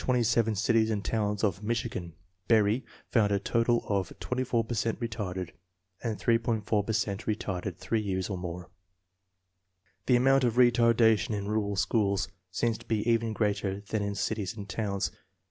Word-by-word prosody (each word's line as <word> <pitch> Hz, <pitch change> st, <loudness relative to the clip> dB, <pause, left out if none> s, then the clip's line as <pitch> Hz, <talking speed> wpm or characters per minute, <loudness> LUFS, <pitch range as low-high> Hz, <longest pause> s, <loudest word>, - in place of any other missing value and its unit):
6 -, -, -8 dB
per -, -, +3 dB
cent -, -, +3 dB
In 120 Hz, -, +2 dB
227 115 Hz, -1 st, +2 dB
cities 110 Hz, +1 st, +2 dB
and 105 Hz, -2 st, -2 dB
towns 105 Hz, -1 st, -1 dB
of 95 Hz, -3 st, +1 dB
Michigan, 110 Hz, -6 st, -3 dB, 0.3 s
Berry 110 Hz, +2 st, +3 dB, 0.3 s
found 105 Hz, -4 st, +3 dB
a 100 Hz, -, +3 dB
total 115 Hz, +4 st, +1 dB
of 100 Hz, -4 st, 0 dB
24 125 Hz, -2 st, 0 dB
per 115 Hz, -, -5 dB
cent 115 Hz, 0 st, -1 dB
retarded, 100 Hz, -7 st, -4 dB, 0.5 s
and 115 Hz, -3 st, -2 dB
3.5 115 Hz, -3 st, +1 dB
per -, -, 0 dB
cent 105 Hz, -2 st, -1 dB
retarded 95 Hz, -4 st, -2 dB
three 115 Hz, -1 st, -1 dB
years 95 Hz, -3 st, -2 dB
or 100 Hz, -, -3 dB
more. 90 Hz, -1 st, -5 dB
1 90 Hz, -, -16 dB, 1.4 s
The 125 Hz, -, +5 dB
amount 135 Hz, +2 st, +4 dB
of 120 Hz, -2 st, +1 dB
retardation 115 Hz, -3 st, +4 dB
in 100 Hz, -1 st, -4 dB
rural 105 Hz, -1 st, 0 dB
schools 100 Hz, -1 st, +1 dB, 0.2 s
seems 115 Hz, +4 st, -1 dB
to -, -, -16 dB
be 110 Hz, -1 st, 0 dB
even 115 Hz, -1 st, +2 dB
greater 100 Hz, -2 st, -1 dB
than 105 Hz, +1 st, -3 dB
in 100 Hz, 0 st, -2 dB
cities 105 Hz, 0 st, -2 dB
and 100 Hz, -1 st, -7 dB
towns. 100 Hz, -1 st, -2 dB
110 Hz, 180 wpm, -29 LUFS, 100-115 Hz, 1.4 s, The